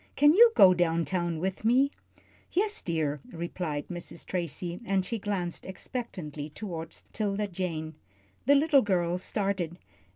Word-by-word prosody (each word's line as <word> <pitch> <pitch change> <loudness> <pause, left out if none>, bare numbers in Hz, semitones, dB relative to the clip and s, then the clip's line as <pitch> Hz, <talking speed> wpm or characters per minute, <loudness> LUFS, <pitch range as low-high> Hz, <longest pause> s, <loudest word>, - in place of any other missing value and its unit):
Can 295 +1 +6
you 460 +5 +8
go 185 -1 +8
down 170 -2 +1
town 175 -3 -1
with 190 +5 -3
me?" 260 +5 +4 0.6
"Yes, 420 +3 +1
dear," 155 -4 -1
replied 165 -3 -4
Mrs. 175 -1 -6
Tracy, 175 0 -3
and 195 -4 0
she 225 +4 -3
glanced 190 -4 -3
expectantly 180 - -5
toward 165 -2 -6 0.2
'Tilda 210 -1 -1
Jane. 170 -4 -4 0.5
The 285 - +7
little 285 -1 +5
girl 180 -4 0
started. 190 -4 -2
180 Hz, 135 wpm, -29 LUFS, 170-210 Hz, 0.6 s, you